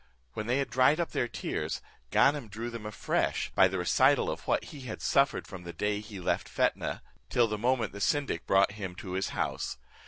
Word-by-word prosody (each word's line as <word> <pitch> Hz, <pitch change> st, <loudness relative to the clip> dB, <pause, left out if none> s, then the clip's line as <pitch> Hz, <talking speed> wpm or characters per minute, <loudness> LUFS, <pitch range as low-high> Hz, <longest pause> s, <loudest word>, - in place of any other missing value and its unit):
When 105 Hz, +6 st, -4 dB
they 125 Hz, +2 st, +2 dB
had 140 Hz, -, -1 dB
dried 130 Hz, +5 st, +4 dB
up 170 Hz, -, -1 dB
their 120 Hz, -, 0 dB
tears, 115 Hz, -, -3 dB, 0.3 s
Ganem 140 Hz, -4 st, +3 dB
drew 115 Hz, +3 st, -5 dB
them 115 Hz, -2 st, -6 dB
afresh, 105 Hz, -, -1 dB
by 95 Hz, -, +6 dB
the 95 Hz, +1 st, -3 dB
recital 90 Hz, -2 st, +3 dB
of -, -, -7 dB
what -, -, +2 dB
he 145 Hz, -, -9 dB
had 125 Hz, -4 st, -6 dB
suffered 140 Hz, 0 st, +2 dB
from 95 Hz, -2 st, -9 dB
the 85 Hz, -1 st, -8 dB
day 105 Hz, +4 st, -1 dB
he 105 Hz, -2 st, -8 dB
left 90 Hz, -, -1 dB
Fetnah, -, -, 0 dB, 0.3 s
till 120 Hz, -2 st, +3 dB
the 105 Hz, -1 st, -3 dB
moment 120 Hz, -2 st, +1 dB
the 100 Hz, -, -7 dB
syndic 140 Hz, -, 0 dB
brought 95 Hz, 0 st, +4 dB
him 100 Hz, -3 st, -6 dB
to 90 Hz, +1 st, -7 dB
his 95 Hz, +1 st, -1 dB
house. -, -, -2 dB
105 Hz, 210 wpm, -30 LUFS, 95-125 Hz, 0.3 s, by